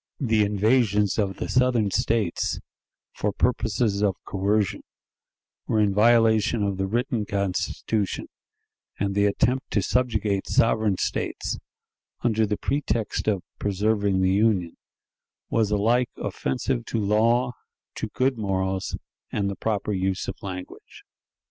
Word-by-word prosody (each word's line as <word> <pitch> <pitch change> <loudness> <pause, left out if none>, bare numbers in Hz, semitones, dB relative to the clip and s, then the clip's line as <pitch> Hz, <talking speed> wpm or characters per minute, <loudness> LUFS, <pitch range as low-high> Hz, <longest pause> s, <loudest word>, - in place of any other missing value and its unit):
The 110 -5 +2
invasions 105 0 +2
of 95 -2 0
the - - -3
Southern 125 -5 +2
States, 115 -4 0 0.5
for 105 - -1
purposes 110 -2 0
of 100 -3 +2
coercion, 100 +1 0 0.9
were 110 - +1
in 105 -2 +3
violation 110 0 +4
of 100 -2 -1
the 95 0 -1
written 120 +2 -1
Constitution, 100 +1 -2 0.7
and 100 0 -1
the 100 +1 +3
attempt 125 +6 0
to 105 - +2
subjugate 110 -5 0
sovereign 110 -4 +2
States, - - -2 0.6
under 110 -2 +2
the 105 0 -1
pretext 130 -6 -1
of 100 -4 +1 0.2
"preserving 100 -1 +1
the 95 0 +3
Union," 100 -5 +2 0.8
was 110 -3 +2
alike 115 +4 +2
offensive 125 -1 -2
to 115 - -3
law, 115 +4 +2 0.4
to - - -4
good 130 -2 0
morals, 95 -2 -1 0.3
and 100 -1 -1
the - - -5
proper 105 -1 -1
use 95 0 -1
of - - -2
language. 90 -2 -8
105 Hz, 125 wpm, -25 LUFS, 100-115 Hz, 0.9 s, violation